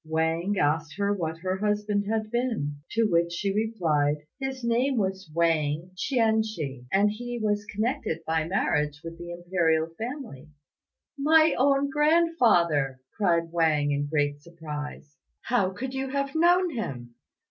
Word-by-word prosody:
Wang 160 +5 0
asked 150 0 0
what 200 -6 -1
her 185 +1 -1
husband 210 0 0
had 215 -1 -1
been; 230 - -1 0.2
to 230 - +2
which 170 -5 +2
she 195 +3 -1
replied, 170 -10 +1 0.2
"His 265 -1 -4
name 245 +3 +1
was 190 -3 -2
Wang 165 0 0
Chien 220 0 +2
chih, 145 - -5
and 205 +2 +3
he 240 +3 -5
was 205 -1 0
connected 210 -6 -2
by 160 0 0
marriage 150 -5 0
with 165 0 -8
the 175 0 -8
Imperial 175 -2 0
family." 235 - -6 0.7
"My 315 +2 +5
own 275 +1 +2
grandfather!" 240 - +3 0.2
cried 170 -5 +1
Wang, 155 -4 +2
in 145 0 -1
great 145 -1 0
surprise; 150 -3 -8 0.3
"how 230 -6 +1
could 255 +8 -6
you 265 0 -3
have 275 0 -2
known 350 +2 +4
him?" 125 - -5
190 Hz, 140 wpm, -27 LUFS, 160-235 Hz, 0.7 s, My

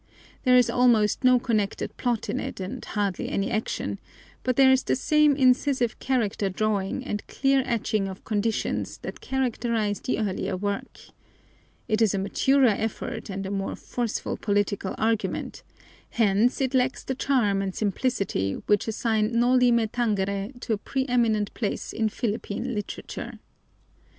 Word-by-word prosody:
There 250 0 +6
is 250 - +5
almost 240 -3 +3
no 255 0 +6
connected 220 -5 -1
plot 240 -3 -1
in 260 - -2
it 265 -4 -5
and 185 0 -5
hardly 200 -4 -2
any 200 0 -1
action, 220 0 -2 0.4
but 255 - 0
there 265 0 +6
is 265 0 +4
the - - 0
same 300 +1 +3
incisive 255 -2 +2
character 220 -6 0
drawing 200 0 -1
and 205 - -3
clear 270 0 +2
etching 215 -3 0
of 190 0 -8
conditions 220 +1 -1
that - - -7
characterize 235 -5 -1
the - - -1
earlier 195 -3 -2
work. 200 +1 -4 0.9
It 215 +1 +1
is 215 -3 +3
a - - 0
maturer 260 +7 +3
effort 220 0 -4
and 195 0 -4
a 190 - -4
more 195 -1 -2
forceful 240 -3 -3
political 200 -1 -1
argument, 225 0 -1 0.5
hence 225 +3 +2
it 265 0 0
lacks 260 +1 +1
the 265 - -2
charm 245 -7 +1
and 190 -1 -3
simplicity 200 - -1
which 205 +1 +2
assign 225 0 0
Noli 250 0 +4
Me 235 -1 +3
Tangere 205 -2 -1
to 230 - -1
a 210 - -2
preeminent 235 -5 0
place 215 -4 -3
in 220 -1 0
Philippine 230 +2 -3
literature. 210 -2 -6
225 Hz, 150 wpm, -26 LUFS, 205-250 Hz, 0.9 s, There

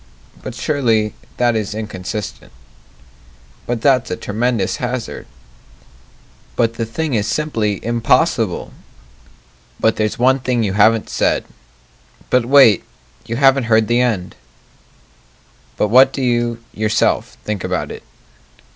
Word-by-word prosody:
But - - -7
surely 115 -6 0 0.2
that 120 -1 +2
is 105 -1 -2
inconsistent 105 -1 -6 1.2
But 120 -2 -2
that's 130 -3 +2
a - - -2
tremendous 110 -1 -1
hazard 125 -2 -4 1.3
But 115 -1 +1
the 115 -1 -4
thing 155 +5 -3
is 105 -2 0
simply 110 -10 -1
impossible 115 - +1 1.1
But 110 - +2
there's 110 -1 -1
one 130 +2 +3
thing 125 -2 0
you 100 -3 -1
haven't 110 +2 +3
said - - 0 0.9
But, 125 -2 +3
wait, 130 -7 +6 0.4
you 115 - -3
haven't 135 0 +4
heard 110 -1 +3
the 120 +1 +2
end 105 -8 -1 1.4
But 105 - +1
what 130 +4 +6
do 135 - -4
you 120 -1 0
yourself 110 0 0
think 105 -3 -4
about - - -2
it? - - -8
115 Hz, 120 wpm, -18 LUFS, 110-125 Hz, 1.4 s, wait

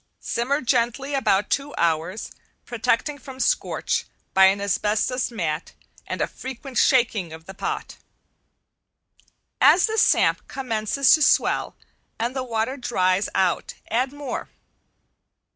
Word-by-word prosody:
Simmer 275 +5 -1
gently 245 +3 0
about 210 -7 +1
two 280 +1 -1
hours, 170 +4 -1 0.3
protecting 245 +5 -1
from 265 -1 -11
scorch, 475 - 0 0.3
by 190 0 +7
an 195 +1 +4
asbestos 210 +5 0
mat 165 -8 -3 0.3
and - - -4
a - - +3
frequent 260 0 -6
shaking 230 - +2
of 160 0 -11
the 195 - -9
pot. - - -4 1.6
As 360 - +6
the 440 0 0
samp - - +3
commences 255 +1 +1
to 315 - +4
swell - - +2 0.4
and 240 +3 -2
the 260 - -1
water 235 +2 -2
dries 185 -6 +1
out 185 -2 0 0.2
add 250 +4 +1
more. 285 -3 -6
235 Hz, 125 wpm, -23 LUFS, 195-270 Hz, 1.6 s, by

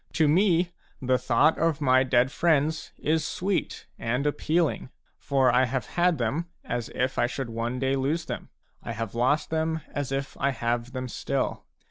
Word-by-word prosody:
To 160 -2 +3
me, 175 +1 +3 0.3
the 130 -1 +1
thought 135 +7 +3
of 165 -2 +1
my 130 -3 +4
dead 125 0 +2
friends 160 -1 +1
is 160 +1 +1
sweet 190 +1 -2
and 125 +5 -1
appealing. 155 -1 0 0.3
For 135 -3 +2
I 125 +2 +4
have 130 0 -2
had 175 -1 +2
them 140 +8 -1 0.2
as 120 -1 -3
if 130 +1 0
I 120 - +3
should 125 -1 -4
one 115 +2 -2
day 135 +1 +1
lose 145 +5 -1
them; - - -6 0.3
I 115 - -5
have 115 -2 -4
lost 130 +7 +1
them 160 0 0
as 140 -2 -3
if 135 0 -3
I 140 - +2
have 120 -1 -2
them 130 -1 -3
still. - - -2
135 Hz, 175 wpm, -27 LUFS, 125-160 Hz, 0.3 s, my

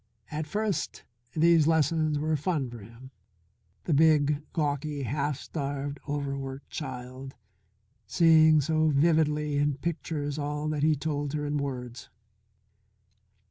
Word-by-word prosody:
At 150 0 -3
first 210 +3 -2 0.3
these 165 -1 +4
lessons 160 -1 +2
were 155 +2 0
fun 145 -4 -1
for 120 - -8
him; 115 +5 -13 0.7
the 165 - 0
big, 150 -1 +4
gawky, 145 -2 -2
half 140 +2 -1
starved, 140 -1 -4
overworked 140 -1 -4
child 130 -1 -7 0.7
seeing 160 - +5
so 155 +2 +1
vividly 150 -1 +2
in 145 -1 +1
pictures 150 -1 -3
all 150 +1 -3
that 150 -2 -2
he 155 +1 +4
told 145 -1 -3
her 150 -1 -2
in 145 0 -1
words. 125 -4 -5
145 Hz, 120 wpm, -28 LUFS, 140-155 Hz, 0.7 s, seeing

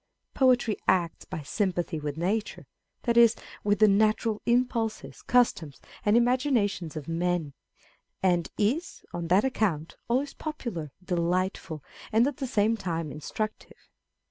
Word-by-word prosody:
Poetry 250 -5 +3
acts 175 -3 +1
by 155 - -6
sympathy 175 -1 -1
with 145 0 -4
nature, 200 +6 -2 0.4
that 235 -2 +1
is, 235 -1 +7 0.3
with 205 0 +2
the 215 - +6
natural 215 +1 +2
impulses, 235 -2 0
customs, 230 - +1 0.2
and 210 +2 +4
imaginations 240 - +1
of 150 -3 -6
men, 165 -3 -1 0.7
and 175 -3 +2
is, 260 +12 -1
on 170 -1 -3
that 185 +5 +4
account, 190 - -1
always 265 +4 0
popular, 235 - -5
delightful, 175 -3 -1 0.3
and 225 +2 +4
at 285 -1 -2
the 270 - -3
same 225 -2 +2
time 165 -7 -3
instructive. 210 +9 -5
205 Hz, 130 wpm, -28 LUFS, 170-235 Hz, 0.7 s, is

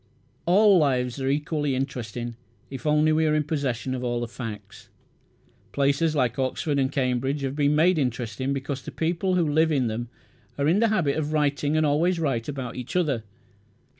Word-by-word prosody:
All 200 +1 +6
lives 130 -3 0
are 135 - 0
equally 145 -1 0
interesting 120 -3 -4 0.4
if 135 +2 -5
only 150 +1 +3
we 160 0 +2
are 155 - +2
in 155 - +2
possession 135 -4 -2
of 125 -1 -4
all 120 -1 -1
the 120 - -3
facts. 105 -4 -8 0.8
Places 140 +3 +1
like 125 -3 0
Oxford 140 +2 0
and 130 0 +1
Cambridge 130 +1 0
have 135 0 -3
been 145 0 +2
made 165 +2 +4
interesting 125 0 -2
because 135 0 -3
the - - -8
people 175 +3 -1
who 170 -3 +2
live 160 +2 +2
in 135 -4 +2
them 115 +1 -3 0.5
are 140 0 +1
in 175 +6 +3
the 230 - +4
habit 165 -10 +1
of 155 0 -2
writing, 145 0 +1
and 155 - +3
always 165 +5 +2
write 135 -8 -1
about 135 -4 -5
each 125 +5 -6
other. 150 -10 +1
140 Hz, 185 wpm, -25 LUFS, 130-155 Hz, 0.8 s, All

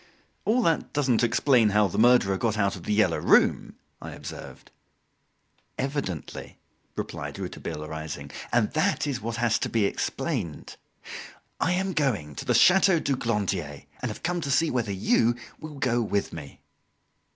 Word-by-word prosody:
"All 235 +3 +2
that 165 -4 0
doesn't 130 -5 +2
explain 120 -1 +3
how 105 0 +3
the 85 - -3
murderer 120 -4 +5
got 110 +2 -1
out 100 -2 +1
of 90 - -10
"The 105 - 0
Yellow 110 - +2
Room"," - - +3 0.3
I - - -7
observed. - - -10 1.1
"Evidently," 135 - -4 0.4
replied - - -5
Rouletabille, 75 0 -6
rising, 80 -1 -6 0.2
"and - - +2
that - - +1
is 140 -4 -3
what 115 +1 -4
has 115 -1 +1
to - - -2
be 110 -3 +1
explained. 110 - -3 0.8
I 180 - +1
am 190 +1 -1
going 115 - -1
to - - -7
the - - +2
Chateau 190 -1 +5
du 140 -3 0
Glandier, 100 - -2 0.2
and - - -2
have - - -8
come 175 0 -1
to 140 - -4
see 160 +4 +2
whether 115 -5 -1
you 115 +4 +2 0.2
will 155 -1 -8
go 120 -3 0
with 100 -2 -1
me." 75 -4 -10
115 Hz, 160 wpm, -26 LUFS, 100-140 Hz, 1.1 s, murderer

